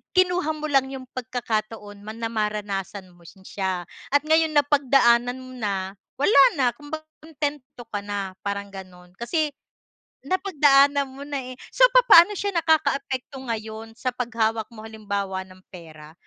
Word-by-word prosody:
kinuha 360 -3 +2
mo 305 - -5
lang 270 -2 +2
yung 265 -1 -7
pagkakataon 220 -4 -4
man 215 +2 -8
na 230 - -1
maranasan 205 -3 -3
mo 175 - -22
na 165 - -13
si 195 - -19
siya, 190 -3 -3 0.3
at 285 0 +4
ngayon 320 0 +3
napagdaanan 265 -4 +3
mo 255 0 -11
na, 195 -3 -2 0.3
wala 405 - +6 0.2
na, 265 - +2
kung 290 +3 -14
ba 315 - -3 0.2
kuntento 290 -5 -5
ka 205 - -4
na, 200 -2 -4
parang 200 0 -3
ganon, 180 -2 -12
kasi, 305 +5 -1 0.8
napagdaanan 285 -7 +3
mo 265 +1 -10
na 285 -1 -4
eh, - - -13 0.2
so, - - +6
papaano 420 -6 +7
siya 400 -1 -3
nakakaapekto 280 -5 0
ngayon 220 0 -5
sa 255 +2 -2
paghawak 225 -3 -1
mo 220 -1 -11
halimbawa 200 -3 -4
ng 185 0 -17
pera? 155 -3 -12
240 Hz, 155 wpm, -24 LUFS, 205-285 Hz, 0.8 s, papaano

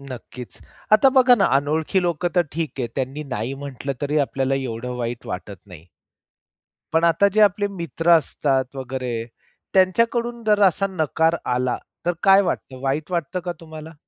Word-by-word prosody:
नक्कीच. 125 -2 -10 0.3
आता 215 +5 +7
बघा 255 -1 +7
ना, 200 - +2
अनोळखी 155 +6 0
लोकं 175 0 0
तर 175 - +6
ठीक 160 0 -2
आहे, 125 - -1
त्यांनी 135 +2 -3
नाही 125 0 -4
म्हटलं 140 -1 -5
तरी 150 +2 +1
आपल्याला 135 -1 0
एवढं 125 -2 -4
वाईट 120 -1 -4
वाटत 100 +2 -6
नाही. 85 -4 -13 1.1
पण 165 +1 +3
आता 170 +4 +4
जे 215 - +4
आपले 205 0 +3
मित्र 170 -3 -1
असतात 135 -3 -1
वगैरे 130 -3 -4 0.5
त्यांच्याकडून 230 +5 +2
जर 210 -1 +4
असा 195 +1 +3
नकार 160 -2 +1 0.2
आला 125 0 0 0.3
तर 175 - +3
काय 195 0 +7
वाटतं? 135 -8 -4
वाईट 145 +5 -2
वाटतं 170 0 -2
का 175 - -1
तुम्हाला? 160 0 -10
155 Hz, 160 wpm, -22 LUFS, 130-185 Hz, 1.1 s, आता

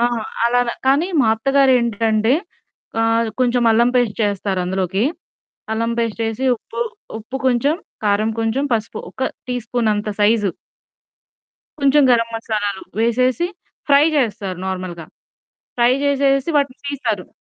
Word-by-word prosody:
ఆ! 235 - +3 0.4
అలాన. 245 +1 +2 0.2
కానీ 280 +6 +3
మా 235 - +3
అత్తగారేంటంటే 235 -4 +2 0.7
ఆహ్, 225 0 +2
కొంచెం 245 -1 +2
అల్లం 235 +2 +4
పేస్ట్ 240 -4 +1
చేస్తారు 200 -2 -1
అందులోకి. 190 +3 -1 0.7
అల్లం 230 +1 -1
పేస్ట్ 230 -1 -2
చేసి, 225 +4 -2
ఉప్పు 230 - -9 0.4
ఉప్పు 240 +5 -6
కొంచెం, 260 +5 +2 0.3
కారం 210 +2 +2
కొంచెం, 225 +5 0
పసుపు 220 0 -2
ఒక 260 - -2 0.2
టీ 250 - -2
స్పూన్ 235 -2 0
అంత 210 +1 -3
సైజు. 205 -2 +3 1.3
కొంచెం 280 +1 +4
గరం 230 -1 +3
మసాలాలు 210 -3 -3 0.2
వేసేసి, 255 +7 +2 0.4
ఫ్రై 285 +1 +6
చేస్తారు 210 -8 -1
నార్మల్‌గా. 185 -3 -5 0.7
ఫ్రై 240 +1 +4
చేసేసి, 275 +1 +2
వాటిని 280 -2 -2
తీస్తారు. 225 -9 -3
230 Hz, 125 wpm, -19 LUFS, 210-255 Hz, 1.3 s, ఫ్రై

